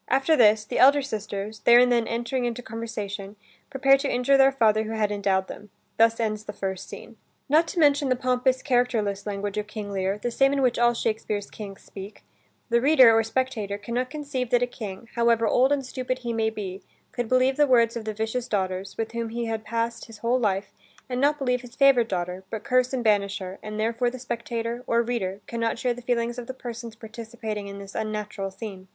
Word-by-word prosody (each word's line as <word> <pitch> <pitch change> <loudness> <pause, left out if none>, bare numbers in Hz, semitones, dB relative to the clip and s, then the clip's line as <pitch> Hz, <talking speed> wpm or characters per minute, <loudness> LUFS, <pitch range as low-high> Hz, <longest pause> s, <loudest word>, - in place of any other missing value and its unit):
After 270 +5 +3
this, 215 -4 +5
the - - -3
elder 280 +2 +6
sisters, 210 -3 -5
there 235 +2 +6
and 250 0 +5
then 235 -2 +2
entering 240 +2 -2
into 240 +1 -3
conversation, 210 -3 -6 0.3
prepare 275 0 +4
to 275 0 -2
injure 250 +3 +3
their 270 0 +6
father 220 -4 +2
who 220 - -4
had 215 -2 0
endowed 195 -2 0
them. 210 - -10 0.3
Thus 230 0 +4
ends 215 -2 -2
the 210 - -6
first 190 -2 -5
scene. 230 - -10 0.3
Not 315 +4 +4
to 340 - -3
mention 285 -2 +4
the 255 - +3
pompous, 255 0 +1
characterless 230 -6 0
language 205 0 -3
of 210 - -5
King 215 -2 -6
Lear, 195 0 -1
the 240 +3 -3
same 270 +3 +3
in 275 -1 +1
which 245 -2 +2
all 240 0 +4
Shakespeare's 215 -2 -2
Kings 200 -2 -9
speak, 195 +2 -10 0.5
the 235 0 +3
reader, 260 -5 +7
or 225 - +5
spectator, 225 -3 -2
can 235 +3 -7
not 250 +1 -1
conceive 285 -4 -4
that 245 0 +3
a - - +1
King, 215 -2 -8
however 235 -1 +3
old 260 +4 +3
and 280 -2 +1
stupid 255 0 -3
he 235 - -1
may 225 -1 +1
be, 200 -3 -6 0.3
could 240 -2 -3
believe 255 +1 +3
the 295 0 +4
words 235 -3 +4
of 230 -2 -5
the 215 - -3
vicious 225 +3 -2
daughters, 190 -1 -2
with 225 -1 -3
whom 230 -1 -3
he 235 +1 -3
had 225 -1 -3
passed 230 +1 -2
his 225 -2 -12
whole 235 +4 +1
life, 200 -4 -1 0.4
and 250 0 -2
not 295 +1 +3
believe 250 -3 0
his 245 -2 -13
favorite 265 -5 +5
daughter, 180 0 -3
but 220 -1 -5
curse 255 0 +2
and 260 -3 -2
banish 200 -2 +2
her; 190 0 -7
and 215 0 -6
therefore 230 +2 +1
the 255 - -8
spectator, 235 -1 -4
or 235 0 +2
reader, 205 -5 -3
can 235 - -5
not 230 0 0
share 245 +1 0
the 245 - -10
feelings 240 0 -1
of 240 - -8
the 260 - -6
persons 235 -3 -7
participating 220 -2 -6
in 200 0 -8
this 195 0 -10
unnatural 210 -2 -3
scene. 190 -2 -9
230 Hz, 220 wpm, -25 LUFS, 210-250 Hz, 0.5 s, reader